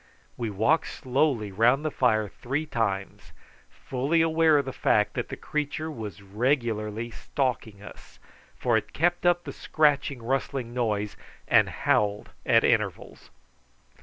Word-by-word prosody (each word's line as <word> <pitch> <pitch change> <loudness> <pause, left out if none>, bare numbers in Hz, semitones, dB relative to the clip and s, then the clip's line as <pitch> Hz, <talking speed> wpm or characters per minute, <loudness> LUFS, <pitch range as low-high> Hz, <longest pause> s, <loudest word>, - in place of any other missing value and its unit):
We 115 -2 -3
walked 110 +11 +2
slowly 130 -5 0
round 120 +9 +3
the 155 - 0
fire 110 -6 +2
three 135 +9 -3
times, 100 -8 -3 0.4
fully 140 +6 0
aware 160 -1 +4
of 140 - +1
the 130 - -5
fact - - +2
that - - -3
the - - -6
creature 150 +1 -3
was 105 - -7
regularly 115 0 -1
stalking 115 -7 -3
us, - - -13 0.4
for 120 -2 +1
it 110 - -5
kept 175 +2 +1
up 175 0 +3
the - - -7
scratching 140 -4 +1
rustling 130 -1 -2
noise, 105 -4 -1 0.3
and - - +4
howled 105 0 0 0.2
at - - +5
intervals. - - -1
125 Hz, 135 wpm, -26 LUFS, 110-150 Hz, 0.4 s, at